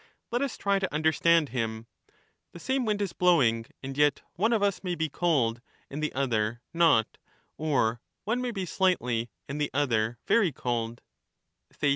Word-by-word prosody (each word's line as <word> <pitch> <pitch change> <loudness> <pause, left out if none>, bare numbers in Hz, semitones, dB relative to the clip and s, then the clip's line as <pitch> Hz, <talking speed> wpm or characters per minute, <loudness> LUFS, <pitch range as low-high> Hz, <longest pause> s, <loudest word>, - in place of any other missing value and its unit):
Let 240 +2 0
us 280 -3 -2
try 200 -1 +1
to 190 - -2
understand 160 0 +3
him: 115 -2 -3 0.7
the 170 - -10
same 260 +7 -1
wind 210 -1 0
is 190 -4 -4
blowing, 125 -11 +3 0.2
and 135 0 -5
yet 145 -1 +2
one 220 +7 +1
of 220 -3 +2
us 200 -1 0
may 180 -2 -2
be 160 -2 -1
cold 130 -9 +1 0.3
and 145 +2 -4
the 155 - -1
other 120 -4 0
not, 165 -10 +3 0.4
or 125 -7 0 0.2
one 235 +4 -1
may 250 - -1
be 195 -5 -3
slightly 125 -12 0 0.2
and 145 +1 -4
the 145 - 0
other 120 -5 +1
very 205 -8 +3
cold 120 -3 -3
150 Hz, 165 wpm, -28 LUFS, 120-190 Hz, 0.7 s, understand